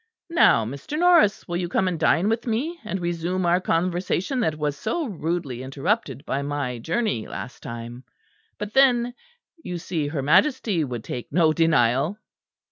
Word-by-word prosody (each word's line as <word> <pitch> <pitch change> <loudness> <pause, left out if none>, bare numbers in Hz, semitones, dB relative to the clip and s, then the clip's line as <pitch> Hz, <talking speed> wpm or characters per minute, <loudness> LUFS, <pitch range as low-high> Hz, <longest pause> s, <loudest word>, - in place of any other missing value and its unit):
Now, 115 - +5
Mr. 140 - -5
Norris, 340 - +4
will 175 -1 -2
you 175 -1 -2
come 190 +1 +1
and 175 -3 -2
dine 165 +4 +3
with 225 +3 -1
me, 285 +10 -1
and 205 -3 -3
resume 175 +1 -2
our 175 +2 +3
conversation 180 - 0
that 160 -10 0
was 150 -1 -1
so 230 - -2
rudely 165 - -3
interrupted 135 - -2
by 140 - -1
my 140 -4 -3
journey 165 - -1
last 125 - -7
time? 120 +2 -7 0.5
But 210 +1 -6
then 245 -3 +4 0.5
you 180 - -4
see 165 -3 -3
her 145 -2 -3
Majesty 210 - +3
would 120 -5 -5
take 120 - -6
no 160 0 +4
denial." 155 - +2
170 Hz, 160 wpm, -24 LUFS, 140-215 Hz, 0.5 s, Now